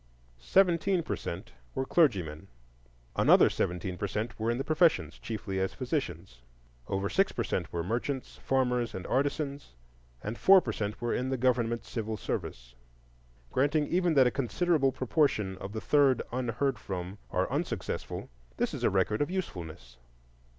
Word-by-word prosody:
Seventeen 180 - +3
per - - -2
cent - - -6 0.2
were 130 - -1
clergymen; 95 - +1 0.7
another - - +6
seventeen 90 +1 -2
per 100 - -1
cent 105 +4 -4
were 110 +1 0
in 120 - +1
the 135 - -1
professions, 155 +2 +2
chiefly 105 -4 -4
as 95 0 -1
physicians. 95 - -4 0.5
Over 95 0 -1
six 195 - +2
per - - -2
cent 90 - -2
were 85 -1 -2
merchants, 125 - -3
farmers, 125 -4 0
and 95 - -5
artisans, 140 - -1 0.5
and 110 +3 -4
four 195 0 +8
per 120 - -3
cent 105 0 -3
were 120 - 0
in 130 +1 -1
the 130 - 0
government 120 -2 +1
civil 110 -2 -4
service. - - -5 0.8
Granting 145 +3 +2
even 175 0 +1
that 135 -2 +7
a 125 - +3
considerable 135 - +1
proportion 125 - +1
of 95 - -6
the 110 - -4
third 140 -3 +3
unheard 125 +1 -1
from 95 +1 -5
are - - 0
unsuccessful, - - -3 0.3
this - - 0
is - - -5
a - - +4
record 95 +4 +1
of 145 - +1
usefulness. 80 - -5
120 Hz, 155 wpm, -30 LUFS, 95-145 Hz, 0.8 s, four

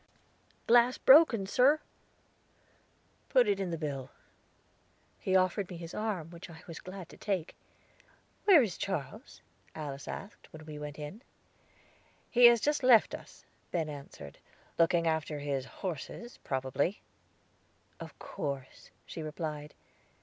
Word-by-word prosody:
"Glass 240 +1 +5
broken, 265 -8 +6
sir." 260 +9 +4 1.5
"Put 250 -4 +5
it 200 -1 +1
in 190 -2 -2
the 165 - -3
bill." 140 -4 -4 1.1
He 190 - 0
offered 185 +1 +2
me 180 - -7
his 165 0 -8
arm, 195 -7 -3
which 170 +1 -10
I 165 +1 -12
was 165 -2 -8
glad 185 -2 -9
to - - -14
take. 190 -6 -2 0.9
"Where 355 -9 +8
is 200 -6 -4
Charles?" 195 - -5 0.3
Alice 145 -3 -6
asked, 195 -1 -8
when 155 0 -11
we 150 -1 -8
went 150 0 -7
in. 150 +9 -7 1.1
"He 245 0 +7
has 235 -2 +8
just 295 +2 +1
left 250 -4 +6
us," - - -10 0.3
Ben 160 -3 -1
answered; 140 - -10 0.4
"looking 170 0 +4
after 160 -2 0
his 140 -2 -2 0.2
horses, 190 - -6
probably." 135 +7 -1 1.0
"Of - - -9
course," 140 -2 -6 0.2
she 165 - -7
replied. 150 -1 -5
170 Hz, 130 wpm, -31 LUFS, 150-215 Hz, 1.5 s, Where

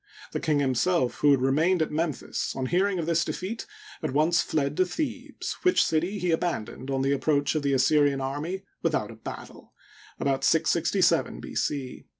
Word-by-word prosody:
The - - -2
king 155 -2 +1
himself, 135 +2 +1
who 150 - +4
had 135 -3 +4
remained 160 +7 +3
at - - -5
Memphis, 155 0 -2
on 130 - -2
hearing 185 +7 +1
of 165 - -2
this 170 0 +2
defeat, 205 +5 -5 0.3
at - - -3
once 155 +4 +3
fled 145 -2 -1
to 185 - +5
Thebes, 290 - -4
which 365 - +4
city 175 +6 0
he 180 -2 0
abandoned 140 -6 -2
on 135 -1 0
the 135 - +1
approach 145 0 +1
of 155 - 0
the 140 -1 0
Assyrian 145 +1 +3
army 145 +8 -3 0.2
without - - 0
a - - -11
battle - - -10 0.5
(about 135 -1 0
667 170 +2 +2
B. - - -8
c). 135 -3 -3
155 Hz, 175 wpm, -27 LUFS, 140-175 Hz, 0.5 s, to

